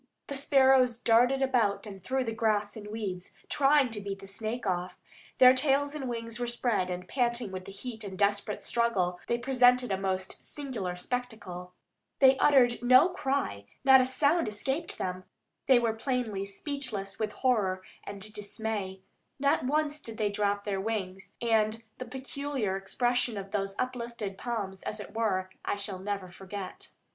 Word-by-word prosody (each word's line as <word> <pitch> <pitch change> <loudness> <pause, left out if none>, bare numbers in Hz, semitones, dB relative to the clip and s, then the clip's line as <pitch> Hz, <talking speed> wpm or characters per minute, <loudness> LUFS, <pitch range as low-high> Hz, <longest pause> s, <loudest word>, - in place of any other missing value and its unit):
The 280 - -5
sparrows 265 -3 +4
darted 245 +4 +4
about 235 -7 +1
and 195 -3 -9
through 260 +3 0
the 230 - -3
grass 215 -2 0
and 210 -2 -8
weeds, 200 -4 -5 0.2
trying 275 -2 +4
to 210 -2 -4
beat 200 -1 -4
the 195 - -12
snake 220 +5 -4
off. 180 -1 -1 0.4
Their 255 0 +9
tails 280 +2 +1
and 275 -4 -4
wings 230 0 -4
were 245 - -1
spread, 235 -6 0
and, 180 0 -5
panting 240 -3 0
with 185 -1 -6
the - - -8
heat 220 +3 -7
and 200 -2 -6
the - - -8
desperate 205 +1 0
struggle, 190 -7 +1
they 235 - +1
presented 250 -1 +4
a 190 - 0
most 190 -1 -2
singular 235 -11 -4
spectacle. 185 -5 -5 0.4
They 270 -1 +7
uttered 245 -5 +5
no 255 +7 +7
cry, 270 - -2 0.2
not 265 -1 +8
a 255 - +1
sound 285 +3 +2
escaped 265 +10 -2
them; 185 0 -3 0.4
they 260 - +7
were 230 -2 +2
plainly 225 -5 -2
speechless 205 -4 -4
with 215 -1 -1
horror 200 -8 +1 0.2
and 200 +1 -8
dismay. 205 -2 -4 0.4
Not 280 -2 +2
once 300 +2 0
did 225 -1 -7
they 210 -2 +1
drop 205 0 0
their 195 -2 -2
wings, 195 -3 -4
and 225 -1 +2 0.2
the 255 - -4
peculiar 265 -4 -3
expression 240 +4 0
of 195 0 -6
those 195 -1 -2
uplifted 235 -6 -4
palms, 200 -6 -3
as 215 - -4
it 205 - -9
were, 190 -5 0
I - - -1
shall 200 -2 -5
never 195 -2 -4
forget. 190 +1 -8
225 Hz, 170 wpm, -29 LUFS, 195-255 Hz, 0.4 s, Their